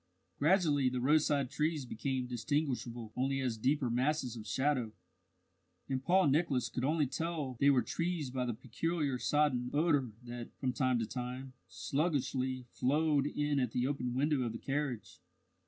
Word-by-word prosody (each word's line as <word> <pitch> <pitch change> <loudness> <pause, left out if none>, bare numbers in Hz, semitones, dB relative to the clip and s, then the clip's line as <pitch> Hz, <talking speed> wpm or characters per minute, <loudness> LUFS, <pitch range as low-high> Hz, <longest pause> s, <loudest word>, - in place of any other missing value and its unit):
Gradually 150 -5 +3
the 125 0 -2
roadside 145 0 +2
trees 155 -2 0
became 130 +2 -2
distinguishable 120 -2 -2
only 135 +2 0
as 125 -4 -1
deeper 130 +4 +1
masses 125 +1 0
of 110 -2 -8
shadow, 130 -5 0 0.9
and 130 -1 -2
Paul 185 +4 +4
Nicholas 140 -4 +1
could 125 - -3
only 150 +2 +2
tell 150 -2 -3
they 140 - +5
were 130 -3 +4
trees 170 -6 -2
by 130 -1 -1
the 120 - -2
peculiar 140 +3 -2
sodden 140 -5 +1
odour 145 -4 +2
that, 120 -1 -7
from 130 -2 0
time 130 0 +2
to 115 - 0
time, 125 +2 -5
sluggishly 130 -4 -1
flowed 145 +1 +2
in 145 -1 0
at 125 -3 -1
the 125 - +1
open 125 -3 -2
window 145 +1 +2
of 120 -3 -2
the - - -4
carriage. 135 -4 -3
135 Hz, 155 wpm, -33 LUFS, 125-150 Hz, 0.9 s, they